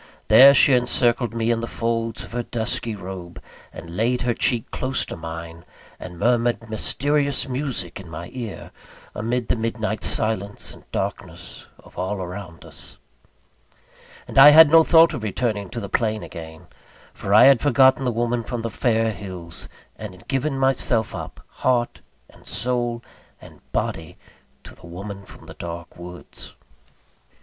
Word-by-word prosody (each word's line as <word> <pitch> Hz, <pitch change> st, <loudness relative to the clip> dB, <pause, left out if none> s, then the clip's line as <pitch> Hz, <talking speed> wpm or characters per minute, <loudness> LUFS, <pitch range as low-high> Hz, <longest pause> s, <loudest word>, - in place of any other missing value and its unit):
There, 140 Hz, +2 st, +9 dB
she 140 Hz, -, +6 dB
encircled 120 Hz, -1 st, +1 dB
me 115 Hz, 0 st, 0 dB
in 115 Hz, -, 0 dB
the 115 Hz, -, -4 dB
folds 115 Hz, -1 st, -2 dB
of -, -, -12 dB
her 120 Hz, +1 st, -2 dB
dusky 115 Hz, -1 st, -3 dB
robe, 90 Hz, -3 st, -8 dB, 0.3 s
and 85 Hz, +1 st, -10 dB
laid 120 Hz, +5 st, 0 dB
her 120 Hz, -1 st, +1 dB
cheek 115 Hz, -1 st, 0 dB
close 130 Hz, 0 st, -2 dB
to -, -, -7 dB
mine, 80 Hz, 0 st, -8 dB, 0.4 s
and 90 Hz, -1 st, -9 dB
murmured 120 Hz, +4 st, +2 dB
a -, -, -11 dB
mysterious 140 Hz, +6 st, 0 dB
music 125 Hz, -, -3 dB
in 95 Hz, -3 st, -11 dB
my 85 Hz, +2 st, -8 dB
ear, 120 Hz, -6 st, -7 dB, 0.4 s
amid 120 Hz, +3 st, -2 dB
the -, -, +1 dB
midnight 110 Hz, -3 st, -3 dB
silence 105 Hz, -2 st, -1 dB
and -, -, -19 dB
darkness -, -, -6 dB
of -, -, -14 dB
all 95 Hz, +3 st, -2 dB
around 90 Hz, -2 st, -8 dB
us. -, -, -10 dB, 1.3 s
And -, -, +1 dB
I 140 Hz, +2 st, +11 dB
had 155 Hz, 0 st, +8 dB
no 165 Hz, 0 st, +8 dB
thought 165 Hz, +1 st, +5 dB
of 125 Hz, -, -5 dB
returning 105 Hz, -2 st, -2 dB
to 120 Hz, -, -5 dB
the 100 Hz, -, -6 dB
plain 110 Hz, +1 st, -1 dB
again; 80 Hz, -2 st, -10 dB, 0.5 s
for 100 Hz, -, -6 dB
I 105 Hz, +4 st, +8 dB
had 135 Hz, -2 st, +6 dB
forgotten 130 Hz, -1 st, +4 dB
the 125 Hz, -, 0 dB
woman 120 Hz, +1 st, -1 dB
from 120 Hz, 0 st, -5 dB
the 115 Hz, -, -3 dB
fair 115 Hz, -2 st, +1 dB
hills, 90 Hz, -4 st, -8 dB, 0.3 s
and 105 Hz, -4 st, -8 dB
had 90 Hz, -, -19 dB
given 135 Hz, +1 st, -1 dB
myself 130 Hz, -4 st, +1 dB
up, -, -, -8 dB
heart, 120 Hz, -2 st, -1 dB, 0.3 s
and -, -, -20 dB
soul, 120 Hz, -1 st, -2 dB, 0.4 s
and -, -, -16 dB
body, 80 Hz, -1 st, -3 dB, 0.5 s
to -, -, -12 dB
the -, -, -15 dB
woman 100 Hz, +3 st, -8 dB
from 100 Hz, -, -15 dB
the -, -, -11 dB
dark 85 Hz, 0 st, -8 dB
woods. 90 Hz, 0 st, -11 dB
115 Hz, 160 wpm, -22 LUFS, 95-125 Hz, 1.3 s, I